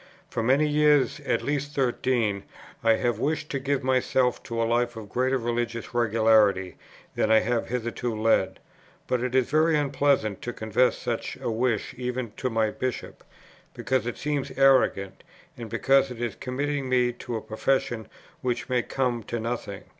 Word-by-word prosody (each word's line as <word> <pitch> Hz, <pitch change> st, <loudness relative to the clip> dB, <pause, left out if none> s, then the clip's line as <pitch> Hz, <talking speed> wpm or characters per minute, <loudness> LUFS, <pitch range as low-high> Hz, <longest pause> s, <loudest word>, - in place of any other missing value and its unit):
For -, -, -1 dB
many 135 Hz, +6 st, +3 dB
years, 150 Hz, -1 st, +3 dB
at -, -, +1 dB
least 145 Hz, 0 st, -2 dB
thirteen, 120 Hz, -5 st, 0 dB, 0.4 s
I 115 Hz, -1 st, +5 dB
have 115 Hz, 0 st, 0 dB
wished 155 Hz, +3 st, -1 dB
to 140 Hz, -, -1 dB
give 140 Hz, 0 st, -1 dB
myself 130 Hz, -1 st, +1 dB
to 115 Hz, -1 st, -4 dB
a 115 Hz, -, +2 dB
life 120 Hz, +1 st, 0 dB
of 105 Hz, -2 st, -8 dB
greater 130 Hz, +2 st, +1 dB
religious 120 Hz, -1 st, -3 dB
regularity 110 Hz, -5 st, +3 dB, 0.4 s
than -, -, 0 dB
I 110 Hz, 0 st, +6 dB
have 120 Hz, 0 st, -1 dB
hitherto 120 Hz, -1 st, -3 dB
led; 110 Hz, -4 st, +2 dB, 0.5 s
but 125 Hz, -2 st, 0 dB
it 125 Hz, 0 st, -2 dB
is 130 Hz, 0 st, +2 dB
very 155 Hz, +1 st, +4 dB
unpleasant 140 Hz, -7 st, +1 dB
to 120 Hz, -, -4 dB
confess 110 Hz, +3 st, +1 dB
such 120 Hz, -2 st, -4 dB
a -, -, -2 dB
wish 115 Hz, -1 st, -1 dB
even 125 Hz, -2 st, -3 dB
to 130 Hz, -, -1 dB
my 110 Hz, -2 st, +1 dB
Bishop, 130 Hz, +1 st, -5 dB, 0.5 s
because 130 Hz, -3 st, -1 dB
it 120 Hz, -, -4 dB
seems 145 Hz, -2 st, -2 dB
arrogant, 130 Hz, -8 st, +3 dB, 0.3 s
and 120 Hz, -4 st, -8 dB
because 135 Hz, +4 st, +3 dB
it 125 Hz, -2 st, -8 dB
is 120 Hz, -1 st, -2 dB
committing 140 Hz, +1 st, -3 dB
me 125 Hz, -1 st, +2 dB
to 120 Hz, 0 st, -6 dB
a 110 Hz, -, -3 dB
profession 115 Hz, 0 st, -1 dB, 0.3 s
which 125 Hz, -2 st, -2 dB
may 125 Hz, -1 st, +2 dB
come 125 Hz, -2 st, -1 dB
to 120 Hz, -, -3 dB
nothing. 115 Hz, -3 st, -4 dB
120 Hz, 170 wpm, -26 LUFS, 115-135 Hz, 0.5 s, I